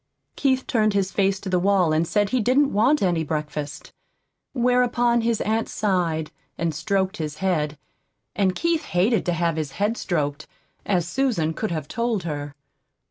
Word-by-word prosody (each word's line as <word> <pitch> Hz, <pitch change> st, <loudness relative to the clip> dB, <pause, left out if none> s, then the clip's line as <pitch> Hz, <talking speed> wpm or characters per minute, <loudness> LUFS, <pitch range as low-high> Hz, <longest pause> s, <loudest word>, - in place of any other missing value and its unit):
Keith 265 Hz, -2 st, +1 dB
turned 215 Hz, -3 st, +1 dB
his 195 Hz, -1 st, +1 dB
face 195 Hz, -1 st, +1 dB
to 195 Hz, -, -9 dB
the 180 Hz, -1 st, +2 dB
wall 185 Hz, -3 st, +3 dB
and 160 Hz, +2 st, +1 dB
said 205 Hz, +1 st, +1 dB
he 255 Hz, +2 st, +1 dB
didn't 270 Hz, +5 st, +3 dB
want 245 Hz, +8 st, +3 dB
any 175 Hz, -3 st, +1 dB
breakfast. 150 Hz, -1 st, -5 dB, 0.6 s
Whereupon 245 Hz, -1 st, +2 dB
his 230 Hz, -1 st, 0 dB
aunt 220 Hz, +1 st, 0 dB
sighed, 175 Hz, -7 st, 0 dB, 0.3 s
and 165 Hz, -1 st, -1 dB
stroked 190 Hz, +6 st, -1 dB
his 150 Hz, -2 st, -4 dB
head; 155 Hz, -6 st, 0 dB, 0.6 s
and 190 Hz, -3 st, +1 dB
Keith 335 Hz, -1 st, 0 dB
hated 195 Hz, +4 st, +1 dB
to 175 Hz, -, +2 dB
have 170 Hz, -1 st, 0 dB
his 150 Hz, -3 st, -3 dB
head 210 Hz, +3 st, 0 dB
stroked, 150 Hz, -4 st, -2 dB, 0.4 s
as 180 Hz, -4 st, +1 dB
Susan 180 Hz, -8 st, 0 dB
could 220 Hz, -, -3 dB
have 155 Hz, -4 st, -3 dB
told 230 Hz, -2 st, -1 dB
her. 145 Hz, -3 st, -5 dB
190 Hz, 165 wpm, -23 LUFS, 160-225 Hz, 0.6 s, wall